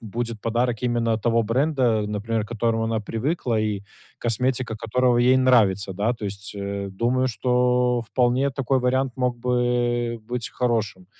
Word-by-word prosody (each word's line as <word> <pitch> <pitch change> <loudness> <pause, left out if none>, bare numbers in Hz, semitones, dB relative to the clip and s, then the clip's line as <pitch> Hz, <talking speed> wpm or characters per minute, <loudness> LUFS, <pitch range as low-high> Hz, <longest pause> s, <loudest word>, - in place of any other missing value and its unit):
будет 115 0 -5
подарок 120 0 0
именно 120 -2 +1
того 115 +1 +2
бренда, 125 -2 +1
например, 105 +1 -2
к - - -13
которому 115 -1 0
она 110 -1 -1
привыкла 115 +2 -1
и 105 -2 -1 0.4
косметика 120 0 -1
которого 120 +2 +1
ей 125 +2 +5
нравится, 105 -7 +3
да. 105 +6 0
То 115 -3 -8
есть, 100 +1 -6
э, 100 0 -4
думаю, 125 +6 0
что 125 0 +1
вполне 125 +3 +1
такой 135 0 0
вариант 130 +1 +1
мог 125 -1 -1
бы 120 -1 0
быть 120 -1 -3
хорошим. 110 -7 -1
120 Hz, 150 wpm, -23 LUFS, 110-125 Hz, 0.4 s, ей